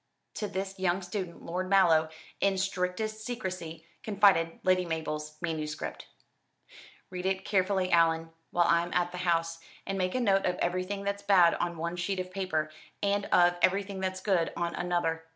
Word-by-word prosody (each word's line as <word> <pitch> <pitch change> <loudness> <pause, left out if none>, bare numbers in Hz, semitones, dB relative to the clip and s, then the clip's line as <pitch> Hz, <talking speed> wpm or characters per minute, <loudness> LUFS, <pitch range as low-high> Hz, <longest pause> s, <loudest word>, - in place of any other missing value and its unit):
To 210 - -2
this 195 0 -5
young 185 0 +1
student 180 -1 -5
Lord 185 +2 -3
Mallow, 165 -5 +5 0.3
in 195 -1 +2
strictest 195 +3 -2
secrecy, 185 -9 -5 0.2
confided 200 -7 +3
Lady 185 -1 +3
Mabel's 155 -2 -4
manuscript. 155 -2 -4 1.0
"Read 180 0 -3
it 190 0 -1
carefully, 190 -1 +1
Allan, 165 -1 +3 0.2
while 175 -1 +2
I'm 170 +1 +2
at 175 0 +1
the 180 - -6
house, 165 -2 0 0.3
and 195 0 -3
make 185 +3 0
a - - +2
note 195 -6 +2
of 180 - 0
everything 185 +3 -2
that's 200 0 -2
bad 190 -4 +5
on 170 -1 -2
one 170 +2 -3
sheet 185 +2 -2
of 185 0 -4
paper, 180 -5 -2 0.3
and 200 0 +1
of 175 0 +4
everything 195 0 +1
that's 185 0 -3
good 185 -5 +1
on 170 0 -1
another. 175 -2 -1
180 Hz, 165 wpm, -29 LUFS, 170-195 Hz, 1.0 s, Mallow